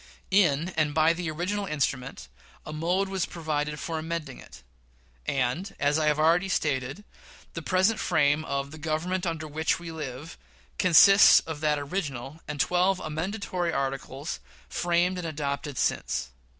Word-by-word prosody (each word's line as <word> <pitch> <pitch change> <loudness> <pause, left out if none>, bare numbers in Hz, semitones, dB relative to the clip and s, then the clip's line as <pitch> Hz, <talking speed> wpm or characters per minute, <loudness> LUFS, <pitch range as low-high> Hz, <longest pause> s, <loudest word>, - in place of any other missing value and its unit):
In 170 -4 +3
and 155 -4 0
by 160 +1 +4
the 170 -1 -4
original 190 +6 -2
instrument, 135 - -2 0.4
a 155 - -6
mode 175 +5 0
was 190 -2 -2
provided 150 -3 -3
for 165 -1 -3
amending 160 -4 -5
it; 65 - -14 0.6
and, 135 +9 -1
as 145 +2 +2
I 155 - +1
have 150 -1 +3
already 170 +5 +3
stated, 135 +2 -1 0.5
the 165 - -5
present 190 +6 +2
frame 145 +1 +2
of 140 -1 -3
"the 155 - -10
Government 170 +4 -2
under 160 -2 -3
which 155 +2 0
we 170 -1 -8
live" 150 0 -7 0.4
consists 195 +3 +8
of 160 -2 -7
that 150 -1 +2
original, 145 -2 -4
and 150 -1 -5
twelve 180 +4 +2
amendatory 175 +2 -3
articles 135 +1 -3 0.3
framed 175 +1 +1
and 170 - -4
adopted 145 -2 -4
since. 65 - -1
155 Hz, 150 wpm, -27 LUFS, 145-175 Hz, 0.6 s, consists